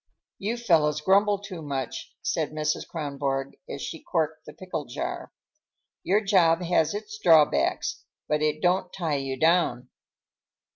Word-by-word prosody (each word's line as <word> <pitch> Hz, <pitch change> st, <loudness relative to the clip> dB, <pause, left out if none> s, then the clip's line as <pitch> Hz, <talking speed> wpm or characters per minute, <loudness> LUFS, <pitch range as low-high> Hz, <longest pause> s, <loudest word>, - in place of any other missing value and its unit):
"You 215 Hz, +4 st, -2 dB
fellows 155 Hz, -9 st, +2 dB
grumble 200 Hz, +5 st, +3 dB
too 195 Hz, -4 st, -8 dB
much," 135 Hz, -4 st, -4 dB
said -, -, 0 dB
Mrs. 155 Hz, 0 st, -1 dB
Kronborg 140 Hz, -3 st, -3 dB
as 140 Hz, -, -5 dB
she 160 Hz, -, -6 dB
corked 160 Hz, -2 st, -2 dB
the -, -, -9 dB
pickle 180 Hz, -5 st, -5 dB
jar. 345 Hz, +1 st, -5 dB, 0.7 s
"Your 200 Hz, +3 st, +2 dB
job 180 Hz, -4 st, +3 dB
has 165 Hz, 0 st, +2 dB
its 210 Hz, 0 st, -6 dB
drawbacks, 160 Hz, -5 st, +3 dB, 0.2 s
but 150 Hz, 0 st, +1 dB
it 155 Hz, +1 st, 0 dB
don't 180 Hz, +1 st, +2 dB
tie 160 Hz, -6 st, -1 dB
you 135 Hz, -1 st, -3 dB
down. 160 Hz, -6 st, +2 dB
165 Hz, 140 wpm, -26 LUFS, 150-195 Hz, 0.7 s, grumble